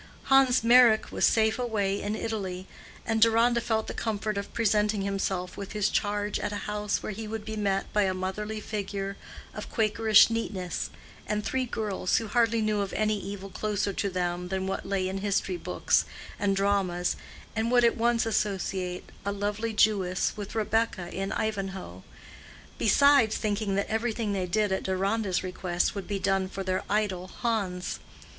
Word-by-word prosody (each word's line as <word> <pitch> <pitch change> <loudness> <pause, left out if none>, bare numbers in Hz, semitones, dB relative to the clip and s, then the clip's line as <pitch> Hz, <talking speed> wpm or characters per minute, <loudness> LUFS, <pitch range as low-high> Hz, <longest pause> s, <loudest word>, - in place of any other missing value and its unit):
Hans 260 -3 +5
Meyrick 235 -2 +6
was - - +2
safe 220 +1 +2
away 205 -5 0
in 210 +1 -2
Italy, 190 -5 -4 0.4
and 225 -1 0
Deronda 230 +1 +4
felt 220 -1 0
the - - -5
comfort 215 -1 -2
of 200 0 -4
presenting 210 -2 +1
himself 195 -2 -2
with 200 - -6
his 210 -1 +1
charge 205 0 -1
at - - -2
a - - -3
house 210 0 -2
where - - -3
he 215 +2 -6
would 220 0 -5
be 220 - -4
met 200 -2 -1
by 210 -1 +3
a 190 - +1
motherly 210 +4 -3
figure 200 -2 -4 0.4
of - - -7
quakerish 220 0 +5
neatness, 190 -6 -3 0.4
and 210 0 -1
three 260 -1 -1
girls 210 -5 -1
who 225 - -1
hardly 230 0 +2
knew 215 -1 +1
of 195 - -3
any 215 -1 +1
evil 195 0 -6
closer 205 -1 -1
to 200 - -1
them 180 -1 -2
than 190 +1 -2
what 190 0 -3
lay 195 -2 0
in 190 +1 -3
history 195 -2 0
books, 175 - +1 0.3
and 200 -1 +1
dramas, 195 -3 +1 0.4
and 220 +1 0
would 245 -1 +5
at 235 - +4
once 235 0 +2
associate 190 -4 -2 0.2
a 200 - -1
lovely 205 +3 -2
Jewess 200 -4 +2
with 205 0 -7
Rebecca 215 -4 0
in 195 +1 -3
Ivanhoe, 190 - -3 0.8
besides 275 0 +5
thinking 205 -1 -1
that 200 - +1
everything 220 -1 -1
they 185 -2 -1
did 210 +2 +1
at 190 - 0
Deronda's 195 +1 0
request 180 -1 -1
would 200 -2 -6
be 205 - -1
done 195 -1 0
for 195 0 -5
their 185 0 -1
idol, 195 -3 0
Hans. 190 -5 -2
205 Hz, 170 wpm, -28 LUFS, 190-220 Hz, 0.8 s, Meyrick